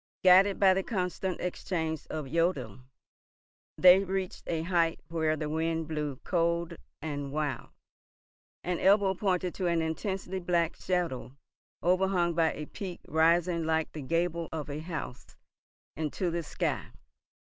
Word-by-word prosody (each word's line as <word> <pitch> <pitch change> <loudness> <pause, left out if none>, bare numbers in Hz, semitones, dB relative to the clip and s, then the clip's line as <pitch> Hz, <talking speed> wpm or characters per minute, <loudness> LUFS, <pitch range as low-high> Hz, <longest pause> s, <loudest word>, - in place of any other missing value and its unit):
Guided 190 +2 +6
by 190 -2 +6
the 190 - +1
constant 185 -2 -2
exchange 160 -3 -3
of 155 -2 -4
jodeln, 135 - -1 0.9
they 185 +1 +8
reached 190 -1 -3
a 160 -1 -1
height 170 -2 +1
where 160 -2 +1
the 155 - -3
wind 160 +1 -1
blew 150 -3 -3
cold 170 -1 0 0.3
and 145 -3 -4
wild, 145 -4 -2 0.9
and 180 -1 -1
Ebbo 195 0 +4
pointed 180 -2 0
to 185 - -2
an 170 -1 +2
intensely 190 +3 -3
black 175 -2 +1
shadow 165 -8 -2 0.5
overhung 180 0 +2
by 165 -1 +2
a 150 - -6
peak 185 +2 -7
rising 170 +2 +3
like 160 0 0
the 155 - -7
gable 170 +3 -1
of 150 -2 -4
a 145 - -4
house 160 -6 -7 0.6
into 160 +4 -2
the 170 0 -1
sky. 155 - -2
170 Hz, 135 wpm, -30 LUFS, 160-180 Hz, 0.9 s, they